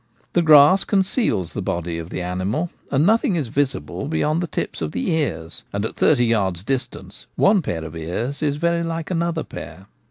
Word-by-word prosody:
The 175 - +3
grass 155 +4 +7
conceals 190 - 0
the - - -3
body 85 -1 -3
of 85 +1 -7
the 90 - -4
animal, 95 - -2 0.2
and 140 +3 +3
nothing 225 - +3
is 145 -8 -2
visible 140 +1 -2
beyond 155 +1 0
the 175 - -2
tips - - -4
of 75 -1 -3
the 90 - -1
ears; 85 - -2
and 100 +1 -2
at - - -4
thirty 120 -5 +3
yards 95 -6 0
distance 130 +3 -5
one 195 -1 +4
pair 80 - -4
of 80 0 -8
ears 90 - -3
is 145 -2 0
very 170 +1 +1
like 165 0 -3
another 170 -2 -1
pair. 95 - -9
140 Hz, 190 wpm, -22 LUFS, -, 0.2 s, grass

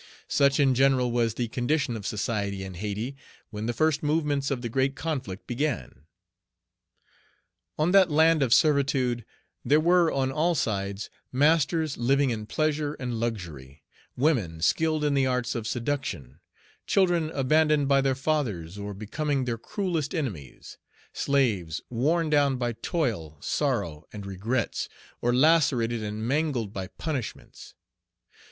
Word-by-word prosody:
Such 140 +1 +3
in 135 -2 +4
general 130 -1 +3
was 115 -2 +1
the 120 0 -1
condition 125 +2 -1
of 105 -3 -5
society 100 -3 -2
in 95 -1 -7
Hayti, 105 +8 -4 0.4
when 105 0 -4
the - - +1
first 155 +5 +1
movements 150 -2 0
of 130 -3 -2
the - - -1
great 135 +3 0
conflict 130 - -4
began. 125 - -3 1.7
On 155 +3 +2
that 190 -2 +6
land 160 +1 +4
of 130 -4 +1
servitude 135 -5 +3 0.4
there 150 +2 +4
were 170 +1 +4
on 135 -1 0
all 165 +5 +1
sides 100 -5 -2 0.2
masters 155 +2 +2
living 135 +2 +2
in 110 -2 -4
pleasure 150 +2 -1
and 125 -3 -4
luxury, 80 - -5 0.3
women 120 - +1
skilled 155 - +1
in 145 -1 +2
the 135 -1 +2
arts 125 -1 -1
of 115 -2 -4
seduction, 115 - -3 0.5
children 175 -5 +2
abandoned 150 +1 +3
by 140 0 +4
their 135 -1 +1
fathers, 110 - -2
or 100 0 -5
becoming 135 +6 -2
their 115 -2 -2
cruellest 170 - -2
enemies, 100 - -6 0.3
slaves, 105 - 0
worn 155 +8 +1
down 145 -3 +3
by 120 -1 -1
toil, 110 - -2
sorrow, 75 +1 -1
and 105 -2 -8
regrets, 105 +6 -2 0.3
or 120 - +2
lacerated 125 -5 +3
and 105 +1 -4
mangled 135 -7 0
by 95 -1 -4
punishments. 140 - -6
130 Hz, 140 wpm, -27 LUFS, 110-150 Hz, 1.7 s, that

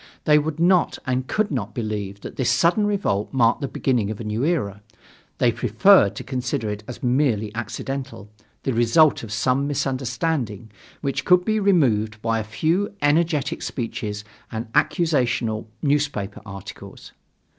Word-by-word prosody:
They 150 0 +5
would 155 +1 -3
not 175 0 +3
and 130 0 -1
could 215 +4 0
not 120 -7 -3
believe 105 -3 -4
that - - -8
this 130 -3 0
sudden 175 - +3
revolt 190 - -1
marked 120 +1 +2
the 140 - -1
beginning 125 -6 0
of 110 - -5
a - - -5
new 105 +3 -2
era. 115 - -1 0.6
They 120 -2 +3
preferred 115 - +4
to - - -6
consider 125 -3 -2
it 105 +1 -6
as 125 - -9
merely 120 -5 +1
accidental, 135 +1 -5 0.4
the 135 - 0
result 120 +7 +4
of 115 - -8
some 130 +5 +1
misunderstanding, 130 - -2 0.3
which 140 0 -2
could 180 +2 +4
be 215 0 +1
removed 120 - +2
by 115 0 0
a - - -2
few 165 - -1
energetic 150 -1 +1
speeches 105 -4 -4 0.3
and 110 0 -6
accusational 125 - +1 0.2
newspaper 140 -9 -1
articles. 100 -2 -10
125 Hz, 150 wpm, -23 LUFS, 110-150 Hz, 0.6 s, They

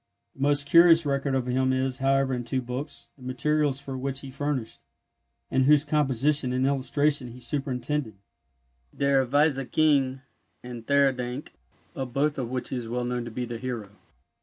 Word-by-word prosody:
The 135 - -12
most 145 0 +3
curious 165 +1 +6
record 140 -1 0
of 130 -2 0
him 130 +1 +1
is, 130 0 -1
however, 135 0 +2
in 125 -1 -2
two 130 +2 -2
books, 125 +4 -4
the - - -21
materials 140 +2 0
for 140 -1 -7
which 135 +1 -3
he 135 - -9
furnished, 140 -4 -3 0.7
and 130 0 +2
whose 150 +1 +5
composition 145 -2 +1
and 130 +1 +1
illustration 140 0 +1
he 120 +1 -11
superintended, 130 -1 -2 0.8
Der 140 -2 +2
Weise 140 -1 +1
King, 140 -4 +2 0.4
and 120 -2 -9
Theurdank, 135 -2 +1 0.4
of 130 -3 -5
both 145 +1 0
of 120 -3 -3
which 125 0 -4
he 130 - -3
is 115 -2 -6
well 120 +1 -2
known 120 -1 -2
to - - -6
be 125 +2 -4
the 120 -1 -6
hero. 115 -5 -5
135 Hz, 170 wpm, -26 LUFS, 125-145 Hz, 0.8 s, curious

